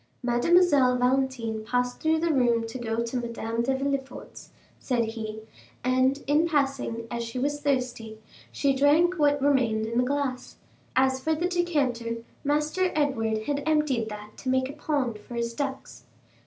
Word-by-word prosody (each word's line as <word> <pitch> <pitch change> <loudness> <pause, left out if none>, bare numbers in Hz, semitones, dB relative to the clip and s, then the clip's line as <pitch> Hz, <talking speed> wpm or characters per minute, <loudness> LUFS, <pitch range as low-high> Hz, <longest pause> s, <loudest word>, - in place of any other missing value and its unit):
"Mademoiselle 260 +1 +4
Valentine 250 -3 0
passed 245 +2 -1
through 320 0 +2
the 330 0 +1
room 240 -4 +2
to 225 +3 -6
go 230 -1 -1
to 235 +2 -3
Madame 235 -1 -3
de 265 +3 +1
Villefort's," 275 0 -4 0.3
said 240 -3 0
he; 220 -1 -6 0.4
"and 260 +2 +2
in 300 +4 +3
passing, 275 -6 -1
as 235 0 -2
she 230 +2 -6
was 290 +3 -1
thirsty, 250 -6 -2 0.3
she 280 -1 +1
drank 310 +6 +3
what 290 -1 +3
remained 250 -6 +2
in 230 +2 -1
the - - +4
glass; 270 -1 -2 0.4
as 260 0 +3
for 315 +4 0
the 345 +3 0
decanter, 285 -10 0 0.3
Master 300 +6 +1
Edward 225 -7 0
had 285 +3 -1
emptied 295 -8 +1
that 210 0 -9
to 260 - -4
make 260 +1 +1
a - - -12
pond 280 -7 -2
for 240 +3 -10
his 235 0 -2
ducks." 275 +1 -5
260 Hz, 160 wpm, -26 LUFS, 235-290 Hz, 0.4 s, Mademoiselle